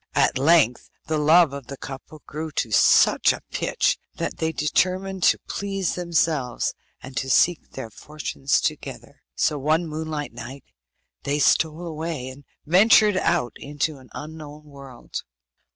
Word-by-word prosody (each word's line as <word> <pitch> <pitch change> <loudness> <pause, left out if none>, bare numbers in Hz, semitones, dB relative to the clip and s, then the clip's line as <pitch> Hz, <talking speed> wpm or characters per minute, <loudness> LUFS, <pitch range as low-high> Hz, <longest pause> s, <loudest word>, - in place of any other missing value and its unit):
At - - +2
length 140 -4 +3 0.2
the 155 0 -1
love 155 0 +5
of 140 -3 -8
the 140 - -8
couple 140 +3 -10
grew 155 +2 -5
to 115 - -2
such - - +5
a - - -6
pitch - - 0 0.2
that - - -4
they 160 0 -1
determined 185 +5 0
to - - +5
please 195 -2 -2
themselves, 165 -7 0 0.3
and 130 0 -10
to 135 - -2
seek 175 +5 +3
their 125 -4 -7
fortunes 145 0 -2
together. - - -5
So 150 -2 +1
one 155 +5 +1
moonlight 155 -3 -5
night 125 +3 -9 0.6
they 140 +1 -1
stole 160 +3 +2
away, 160 -5 -4
and 135 +2 -13 0.2
ventured 205 +4 +5
out 170 -9 0
into 145 +1 -3
an 130 - -17
unknown 150 0 -9
world. 140 -4 -9
150 Hz, 145 wpm, -23 LUFS, 140-165 Hz, 0.6 s, love